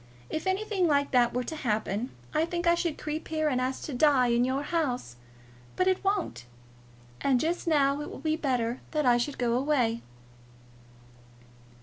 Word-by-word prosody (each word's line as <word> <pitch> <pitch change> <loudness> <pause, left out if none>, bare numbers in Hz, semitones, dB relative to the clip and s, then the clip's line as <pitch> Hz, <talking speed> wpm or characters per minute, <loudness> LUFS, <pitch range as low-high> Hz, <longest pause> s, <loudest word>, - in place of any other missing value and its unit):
If 315 +3 -3
anything 380 -1 +1
like 285 -2 +2
that 245 -2 +4
were 250 +1 -1
to 315 - -5
happen, 220 -3 -1 0.2
I 310 +1 +2
think 345 +1 -3
I 340 - +5
should 340 -2 -1
creep 305 +1 -4
here 310 -1 0
and 255 -3 0
ask 260 +1 -2
to 295 - -5
die 255 -2 +4
in 235 +1 +3
your 260 +3 0
house. 265 - -2 0.6
But 370 - +2
it 375 0 +1
won't. 390 - -1 0.8
And 265 -3 +3
just 335 +4 -1
now 285 -2 +3
it 295 - -6
will - - -8
be 315 -1 0
better 250 -5 -1
that 305 -2 +1
I 245 -1 +5
should 270 +4 -2
go 240 -2 +1
away." 250 -3 +1
285 Hz, 180 wpm, -28 LUFS, 250-320 Hz, 0.8 s, I